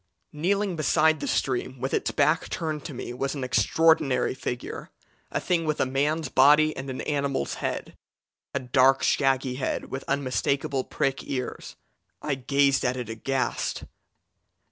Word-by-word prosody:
"Kneeling 190 +5 0
beside 155 0 +3
the - - -4
stream 130 0 -1
with 130 +2 -3
its - - +1
back 155 +2 +1
turned 155 -3 -3
to 155 - -6
me 120 - -6
was 135 +3 -2
an 135 - -4
extraordinary 130 +2 +3
figure 125 -2 -5 0.4
a - - -1
thing 175 -2 0
with 155 -1 -1
a - - +3
man's 145 +5 0
body 150 +3 +5
and 135 0 -6
an 130 - -4
animal's 140 - -1
head - - -3 0.6
a 140 - -1
dark, 130 +1 +3
shaggy 135 -2 +1
head 130 - -3
with 135 +1 -4
unmistakable 140 0 0
prick 135 +1 -2
ears. 130 -2 -5 0.4
I 150 - -2
gazed 140 +1 +2
at 125 0 0
it 120 -3 -5
aghast. 130 +4 -2
135 Hz, 150 wpm, -26 LUFS, 130-150 Hz, 0.6 s, body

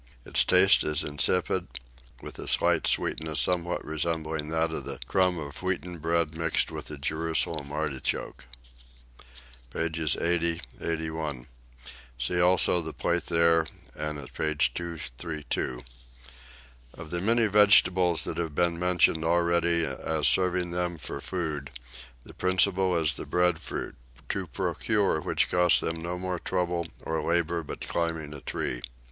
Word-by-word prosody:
Its - - +3
taste 95 +2 +5
is 75 +1 0
insipid, 85 +5 0 0.6
with - - -8
a - - -6
slight - - +3
sweetness 80 -1 +1
somewhat 90 -1 0
resembling 80 -1 -2
that 80 0 0
of - - -2
the - - -3
crumb 90 -1 +2
of 70 -3 -7
wheaten 90 -2 -3
bread 85 0 0
mixed 80 -1 0
with - - -7
a 75 - -7
Jerusalem 80 0 -1
artichoke. 75 -4 -3 1.2
Pages 80 -2 -1
80, 85 0 +1 0.2
81. 80 -5 -3 0.7
See 85 +9 0
also 90 0 +4
the 80 -1 -6
plate 85 -1 -1
there 85 -1 +3 0.3
and 75 0 -3
at 70 -3 -10
page 75 +1 0
232. 75 -5 -4 1.1
Of 85 -2 -9
the 85 0 -1
many 115 +3 +3
vegetables 95 -5 +5
that 80 - -4
have 80 -4 -3
been 85 0 +1
mentioned 90 -3 +3
already 85 0 +2
as 75 +3 0
serving 90 -1 +3
them 90 -1 -2
for 70 -1 -4
food, 80 -6 -4 0.5
the - - -12
principal 95 0 +2
is 80 -3 +2
the - - -7
breadfruit, 90 -2 -1 0.4
to 95 -2 -2
procure 100 - 0
which - - 0
costs 90 -1 +4
them 80 0 -3
no 90 +1 -3
trouble 90 -2 -1 0.2
or 80 -1 -2
labour 85 +1 0
but 80 - -8
climbing 80 -3 -2
a 70 - -9
tree. - - -3
85 Hz, 135 wpm, -27 LUFS, 80-90 Hz, 1.2 s, taste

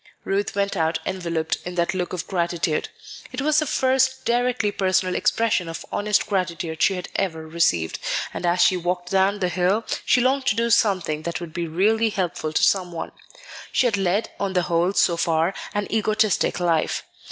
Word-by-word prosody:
Ruth 200 +1 -1
went 200 0 0
out 160 -1 +1
enveloped 170 -4 -2
in 180 0 -6
that 170 +1 0
look 180 -1 -2
of 180 - -4
gratitude. 170 -3 -1 0.4
It - - -5
was 305 +2 +3
the 310 - -1
first 265 0 +1
directly 240 -3 +1
personal 185 -2 +1
expression 210 -6 +1
of 165 - -7
honest 210 0 +1
gratitude 170 -4 -2
she 195 - +4
had 180 - -5
ever 160 -5 -2
received; 90 - +1 0.3
and - - -5
as 175 0 +2
she 180 +2 +4
walked 180 0 -3
down 195 +1 +3
the 180 - +2
hill, 185 +5 +1 0.2
she - - +3
longed 265 +2 +1
to - - +3
do 230 +1 0
something 185 -9 +2
that 170 +1 -4
would 170 -3 -8
be 170 0 -3
really 215 +7 +2
helpful 180 -6 -2
to - - +1
some 185 -3 +2
one. 165 -1 -5 0.6
She - - +2
had 230 -4 +2
led, 195 +2 0
on 200 -1 -1
the 180 -1 +2
whole, 175 +1 +1
so 170 -3 +3
far, 165 +2 +1 0.2
an 205 0 0
egotistic 215 -3 +1
life. 170 -3 0
185 Hz, 185 wpm, -23 LUFS, 170-210 Hz, 0.6 s, she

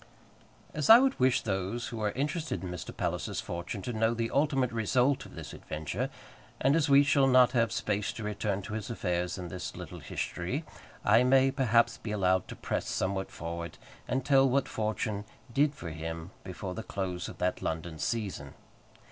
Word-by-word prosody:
As 150 -2 -1
I 225 - +12
would 265 +1 +2
wish 130 0 +4
those 95 +3 -2
who 115 -2 -5
are 105 - +2
interested 150 - -2
in 90 - -4
Mr. 90 -2 -6
Palliser's - - -2
fortunes 85 +3 -5
to 125 - -3
know 115 +1 +2
the 115 0 -1
ultimate 135 -3 +2
result 125 +4 +1
of - - -14
this - - -8
adventure, 75 -1 -4 0.5
and 135 +3 +3
as 160 -2 +2
we 140 +1 +7
shall 140 -1 +4
not 125 -1 +6
have 115 -3 +2
space 105 -4 -1
to 115 - -7
return 105 -1 -2
to 105 - -6
his 110 0 -4
affairs 90 -5 -1
in 90 -2 -6
this 90 +1 -5
little - - -8
history, 125 - -3 0.4
I 115 +4 +6
may, 135 +1 +5
perhaps, 120 -4 +3
be 115 - -6
allowed 95 -3 +2
to - - -7
press - - -3
somewhat 95 0 -1
forward, 85 -1 -6 0.3
and 130 0 -1
tell 135 -1 +5
what 135 +1 +2
Fortune 110 -1 -2 0.3
did 145 +2 +3
for 85 - -6
him 80 +2 -6
before 95 0 -5
the 110 - -5
close 95 -4 -4
of - - -10
that 90 0 -1
London 80 0 -3
season. 110 -1 -3
110 Hz, 185 wpm, -30 LUFS, 90-130 Hz, 0.5 s, I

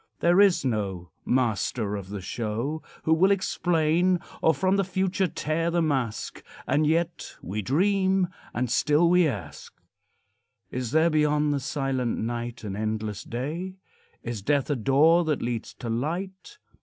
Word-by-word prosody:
There 175 +3 +5
is 195 -7 +4
no 100 -7 -2
"master 115 -3 0
of 100 -2 -7
the 100 -1 -5
show" 115 - -3 0.2
Who 160 - +3
will 180 +4 +4
explain, 175 -2 +2 0.2
Or 160 - +5
from 185 +6 +1
the 195 - +2
future 190 0 0
tear 165 +1 -1
the 170 0 +1
mask; 130 -8 -2 0.2
And 150 +1 +2
yet 170 +2 -1
we 105 +4 -3
dream, 190 - +2 0.2
and 125 +1 -1
still 150 +6 +3
we 180 -1 +4
ask 110 - -6 1.0
Is 125 -2 -3
there 160 +4 +3
beyond 150 -1 +2
the 140 - 0
silent 135 -3 -2
night 120 +1 -4
An 100 -2 -4
endless 110 -1 -3
day? 160 +10 -4 0.5
Is 120 -3 -4
death 140 +5 +1
a - - +2
door 145 +8 +4
that 155 -3 -1
leads 120 -1 -4
to 120 - -7
light? 180 - -4
150 Hz, 150 wpm, -26 LUFS, 115-175 Hz, 1.0 s, There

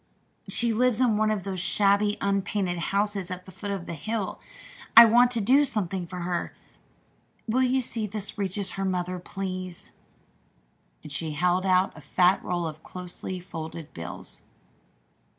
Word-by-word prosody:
She 235 -1 +2
lives 245 0 +2
in 245 -4 +3
one 215 0 +2
of 210 -3 -1
those 190 -1 -4
shabby, 205 +2 +3
unpainted 195 -2 0
houses 200 +1 -1
at 180 0 -6
the 190 - -11
foot 190 +3 -7
of 195 -3 -3
the - - -5
hill. 210 +5 -3 0.6
I 235 - +13
want 240 +2 +5
to 235 -2 0
do 260 +8 +5
something 195 -8 -2
for 180 0 -6
her. 175 0 -3 0.9
Will 240 +4 +2
you 260 +1 +2
see 225 -3 -1
that - - -16
this 210 -2 -1
reaches 195 -1 -2
her 195 - -4
mother, 180 -1 -2
please?" 185 -1 -5 1.1
And - - -9
she 160 -2 -1
held 180 +4 +1
out 185 +1 +3
a 155 - -11
fat 180 +6 +2
roll 175 -1 -2
of 155 -1 -6
closely 180 +1 -7
folded 165 -3 -8
bills. 85 +1 -6
190 Hz, 165 wpm, -26 LUFS, 180-215 Hz, 1.1 s, I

